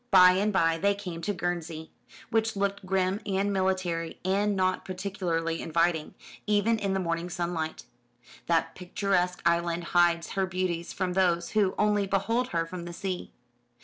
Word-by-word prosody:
By 180 Hz, -3 st, +8 dB
and 200 Hz, +3 st, +1 dB
by 165 Hz, -4 st, +2 dB
they 200 Hz, +3 st, +2 dB
came 180 Hz, -4 st, -6 dB
to 185 Hz, -, -1 dB
Guernsey, 170 Hz, -3 st, -4 dB, 0.4 s
which 225 Hz, -1 st, +1 dB
looked 200 Hz, -1 st, -2 dB
grim 190 Hz, +2 st, +1 dB
and 200 Hz, 0 st, 0 dB
military, 185 Hz, -3 st, -1 dB
and 200 Hz, +2 st, +2 dB
not 185 Hz, -1 st, +1 dB
particularly 180 Hz, -3 st, -2 dB
inviting, 165 Hz, -1 st, 0 dB, 0.3 s
even 210 Hz, +2 st, +2 dB
in 195 Hz, -2 st, -1 dB
the -, -, +1 dB
morning 170 Hz, -1 st, -2 dB
sunlight. 170 Hz, -2 st, -3 dB, 0.6 s
That 165 Hz, -1 st, +1 dB
picturesque 180 Hz, 0 st, -1 dB
island 170 Hz, 0 st, +1 dB
hides 170 Hz, -1 st, +3 dB
her 195 Hz, -1 st, 0 dB
beauties 180 Hz, -2 st, -2 dB
from 185 Hz, -1 st, -2 dB
those 175 Hz, -2 st, +2 dB
who 205 Hz, -3 st, +2 dB
only 210 Hz, -1 st, +2 dB
behold 225 Hz, +6 st, +1 dB
her 165 Hz, -7 st, -1 dB
from 175 Hz, +1 st, -7 dB
the 175 Hz, -, -7 dB
sea. 185 Hz, 0 st, -4 dB
185 Hz, 155 wpm, -28 LUFS, 170-195 Hz, 0.6 s, By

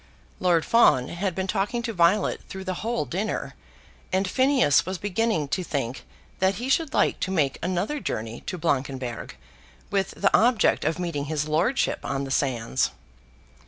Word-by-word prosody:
Lord 175 Hz, -3 st, +2 dB
Fawn 130 Hz, -, +4 dB
had 180 Hz, 0 st, -2 dB
been 190 Hz, -, -1 dB
talking 210 Hz, +5 st, -1 dB
to 230 Hz, -1 st, -3 dB
Violet 185 Hz, +3 st, +2 dB
through 190 Hz, 0 st, -6 dB
the 185 Hz, -1 st, -2 dB
whole 235 Hz, +2 st, -1 dB
dinner, 195 Hz, +5 st, -3 dB, 0.6 s
and 190 Hz, +1 st, +1 dB
Phineas 255 Hz, -, +3 dB
was 185 Hz, +1 st, -4 dB
beginning 205 Hz, -5 st, 0 dB
to 185 Hz, -, -1 dB
think 135 Hz, -6 st, -3 dB, 0.3 s
that 190 Hz, +1 st, +2 dB
he 245 Hz, +7 st, -4 dB
should 315 Hz, +2 st, +1 dB
like -, -, +2 dB
to -, -, -2 dB
make 150 Hz, -8 st, 0 dB
another 185 Hz, -, -1 dB
journey 110 Hz, -, -4 dB
to 180 Hz, -, -3 dB
Blankenberg, 135 Hz, -6 st, -2 dB, 0.6 s
with 195 Hz, -1 st, 0 dB
the 200 Hz, -, +3 dB
object 235 Hz, 0 st, +3 dB
of 160 Hz, -, 0 dB
meeting 170 Hz, -5 st, -3 dB
his 150 Hz, 0 st, -2 dB
lordship 170 Hz, -, +1 dB
on 135 Hz, 0 st, -2 dB
the 135 Hz, -, -5 dB
sands. 120 Hz, -, 0 dB
180 Hz, 160 wpm, -25 LUFS, 145-210 Hz, 0.6 s, Fawn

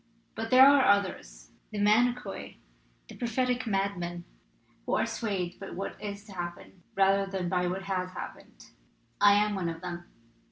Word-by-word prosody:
But 225 Hz, 0 st, -4 dB
there 255 Hz, +2 st, +8 dB
are 280 Hz, -1 st, +6 dB
others, 185 Hz, -, 0 dB, 0.2 s
the 215 Hz, -, -7 dB
manikoi, 235 Hz, +4 st, +1 dB, 0.5 s
the -, -, -11 dB
prophetic 250 Hz, +1 st, -1 dB
madmen, 195 Hz, -4 st, -2 dB, 0.6 s
who -, -, +1 dB
are -, -, +2 dB
swayed 190 Hz, -6 st, -3 dB
by -, -, -7 dB
what 195 Hz, +2 st, -5 dB
is 200 Hz, -1 st, -6 dB
to 210 Hz, -, -13 dB
happen 175 Hz, +1 st, -7 dB
rather 195 Hz, 0 st, +3 dB
than 190 Hz, -2 st, -3 dB
by 180 Hz, -1 st, +1 dB
what 190 Hz, +2 st, -3 dB
has 185 Hz, -1 st, -2 dB
happened. -, -, -10 dB, 0.6 s
I'm 205 Hz, +1 st, +5 dB
one 185 Hz, -4 st, -2 dB
of 165 Hz, 0 st, -7 dB
them. 175 Hz, -1 st, -6 dB
195 Hz, 155 wpm, -29 LUFS, 180-210 Hz, 0.6 s, there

